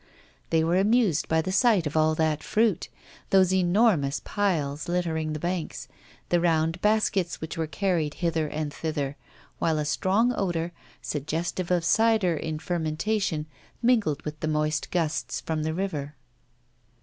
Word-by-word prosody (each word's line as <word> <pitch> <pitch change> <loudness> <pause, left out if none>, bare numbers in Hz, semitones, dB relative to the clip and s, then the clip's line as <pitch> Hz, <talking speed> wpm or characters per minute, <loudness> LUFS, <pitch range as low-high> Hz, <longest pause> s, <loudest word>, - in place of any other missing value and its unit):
They 160 -1 +3
were 170 +2 +2
amused 210 - +2
by 160 0 +2
the 185 - -3
sight 200 -3 +3
of 150 - -3
all 155 0 +3
that 155 -1 +1
fruit, 215 -5 +1 0.4
those 190 -1 +4
enormous 180 -6 +3
piles 155 -8 -1
littering 165 -3 -1
the 155 - -4
banks, 175 0 -3 0.4
the 175 - +3
round 165 0 +1
baskets 210 -4 +1
which 160 - -5
were 160 -1 -2
carried 165 -4 -1
hither 165 -3 0
and 150 -1 -4
thither, 145 -4 -3 0.4
while 160 -1 +1
a 150 - -1
strong 195 +10 +2
odour, 175 -4 -1 0.3
suggestive 165 +5 -3
of 175 -2 +1
cider 220 -3 +3
in 155 0 -3
fermentation, 165 +1 -1 0.4
mingled 215 - +2
with 150 0 -5
the 155 - -2
moist 155 0 0
gusts 160 -3 -1
from 160 -1 -3
the 160 +1 -1
river. 150 -6 -3
165 Hz, 150 wpm, -26 LUFS, 155-190 Hz, 0.4 s, those